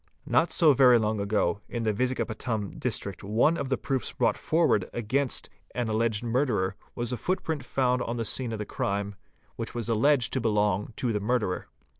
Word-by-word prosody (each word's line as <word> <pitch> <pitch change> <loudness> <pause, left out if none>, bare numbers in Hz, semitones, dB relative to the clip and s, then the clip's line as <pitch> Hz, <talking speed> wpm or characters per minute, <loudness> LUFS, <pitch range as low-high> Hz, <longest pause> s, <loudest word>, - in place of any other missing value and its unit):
Not 170 - +2
so 155 -4 +5
very 125 -2 +6
long 110 -1 0
ago 100 -2 0
in 120 -1 -3
the 110 -1 +1
Vizagapatam 110 -3 -2
District 100 -6 -3
one 110 +11 +3
of 140 -5 -3
the 130 - +1
proofs 130 -3 -2
brought - - +1
forward 155 - +1
against 125 +4 -1 0.3
an 120 -2 -1
alleged 110 0 0
murderer 115 -6 0 0.2
was 120 0 -2
a - - -2
footprint 160 - -2
found 125 -1 +1
on 120 0 -3
the 115 - -2
scene 125 +1 -2
of 110 - -3
the 105 - -4
crime, 100 +1 -2 0.4
which - - -5
was 120 -1 -3
alleged 125 +3 +3
to 130 - +1
belong 105 -2 +1
to 120 -3 -1
the 105 - 0
murderer. 105 -3 -1
115 Hz, 185 wpm, -27 LUFS, 105-130 Hz, 0.4 s, very